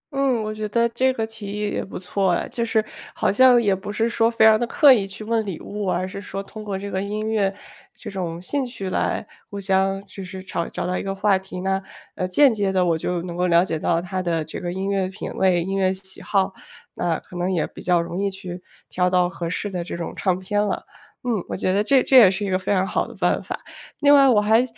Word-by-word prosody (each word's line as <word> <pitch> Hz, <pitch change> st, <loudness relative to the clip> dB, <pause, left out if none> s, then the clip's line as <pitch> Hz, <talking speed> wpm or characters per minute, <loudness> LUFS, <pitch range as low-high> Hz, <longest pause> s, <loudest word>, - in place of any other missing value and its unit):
嗯， 265 Hz, -5 st, +1 dB
我 215 Hz, 0 st, -3 dB
觉 215 Hz, 0 st, -4 dB
得 235 Hz, +2 st, +2 dB
这 255 Hz, +3 st, +2 dB
个 225 Hz, -3 st, -2 dB
提 220 Hz, -2 st, -9 dB
议 205 Hz, +1 st, -2 dB
也 -, -, -2 dB
不 -, -, -8 dB
错 190 Hz, 0 st, 0 dB
哎。 -, -, -1 dB
就 235 Hz, -, -2 dB
是 220 Hz, -2 st, +1 dB, 0.3 s
好 -, -, +1 dB
像 250 Hz, +2 st, +6 dB
也 200 Hz, -3 st, +2 dB
不 190 Hz, +2 st, -6 dB
是 225 Hz, +2 st, +1 dB
说 230 Hz, 0 st, +2 dB
非 230 Hz, -1 st, +3 dB
常 220 Hz, 0 st, +7 dB
地 240 Hz, -, -1 dB
刻 280 Hz, +2 st, +7 dB
意 200 Hz, -5 st, 0 dB
去 200 Hz, +3 st, -7 dB
问 225 Hz, 0 st, 0 dB
礼 190 Hz, -6 st, -5 dB
物， 205 Hz, -1 st, -5 dB
而 180 Hz, +1 st, 0 dB
是 195 Hz, +1 st, -7 dB
说 195 Hz, 0 st, -5 dB
通 215 Hz, +2 st, -10 dB
过 200 Hz, -2 st, -3 dB
这 200 Hz, +1 st, -6 dB
个 190 Hz, -, -1 dB
音 210 Hz, +2 st, -3 dB
乐， 210 Hz, -3 st, +1 dB, 0.5 s
这 -, -, -8 dB
种 175 Hz, -3 st, -4 dB
兴 270 Hz, +11 st, -2 dB
趣 200 Hz, -7 st, -5 dB
来 -, -, -1 dB, 0.2 s
互 200 Hz, -, -6 dB
相 195 Hz, 0 st, +1 dB
就 195 Hz, 0 st, -9 dB
是 185 Hz, 0 st, -8 dB
找 170 Hz, -3 st, -3 dB
找 -, -, -4 dB
到 180 Hz, -, -1 dB
一 -, -, -3 dB
个 195 Hz, 0 st, -3 dB
话 195 Hz, -1 st, +2 dB
题， 185 Hz, -1 st, -8 dB
那， 190 Hz, 0 st, 0 dB, 0.3 s
呃， 185 Hz, -, -2 dB
间 245 Hz, +7 st, +5 dB
接 200 Hz, -2 st, 0 dB
地 185 Hz, -1 st, +2 dB
我 170 Hz, -, +2 dB
就 170 Hz, +2 st, -2 dB
能 175 Hz, -1 st, -6 dB
够 180 Hz, +1 st, +1 dB
了 170 Hz, +1 st, +4 dB
解 160 Hz, -4 st, -3 dB
到 165 Hz, +1 st, +1 dB
他 185 Hz, +1 st, -3 dB
的 165 Hz, -3 st, -1 dB
这 155 Hz, -, -7 dB
个 175 Hz, -, -3 dB
音 190 Hz, +2 st, -3 dB
乐 195 Hz, -2 st, 0 dB
品 190 Hz, +2 st, -7 dB
味， 180 Hz, -3 st, +2 dB
音 195 Hz, +2 st, -3 dB
乐 190 Hz, -1 st, +2 dB
喜 190 Hz, 0 st, -7 dB
好。 195 Hz, -1 st, +1 dB, 0.4 s
那 165 Hz, -2 st, -1 dB
可 180 Hz, -, -15 dB
能 175 Hz, +2 st, -1 dB
也 170 Hz, -4 st, +1 dB
比 -, -, -11 dB
较 175 Hz, -1 st, +2 dB
容 170 Hz, +3 st, -3 dB
易 200 Hz, -, +1 dB
去 185 Hz, -2 st, -7 dB, 0.3 s
挑 180 Hz, 0 st, +1 dB
到 180 Hz, -1 st, +3 dB
合 175 Hz, -2 st, -5 dB
适 205 Hz, +3 st, -3 dB
的 180 Hz, -2 st, -3 dB
这 170 Hz, -, -6 dB
种 170 Hz, -, -5 dB
唱 185 Hz, -2 st, 0 dB
片 205 Hz, +2 st, 0 dB
了。 205 Hz, -, -2 dB, 0.4 s
嗯， 225 Hz, -6 st, 0 dB
我 -, -, -4 dB
觉 185 Hz, -, 0 dB
得 200 Hz, +2 st, +2 dB
这 265 Hz, +2 st, +4 dB
这 265 Hz, -, +5 dB
也 210 Hz, -7 st, +9 dB
是 195 Hz, +2 st, -2 dB
一 195 Hz, -, -2 dB
个 185 Hz, 0 st, +1 dB
非 190 Hz, +2 st, -1 dB
常 190 Hz, 0 st, +2 dB
好 -, -, -1 dB
的 -, -, -11 dB
办 -, -, +1 dB
法。 -, -, -5 dB, 0.4 s
另 285 Hz, 0 st, +6 dB
外 275 Hz, -1 st, +7 dB
我 220 Hz, -5 st, +5 dB
还 220 Hz, +3 st, +4 dB
195 Hz, 285 characters per minute, -23 LUFS, 185-215 Hz, 0.5 s, 也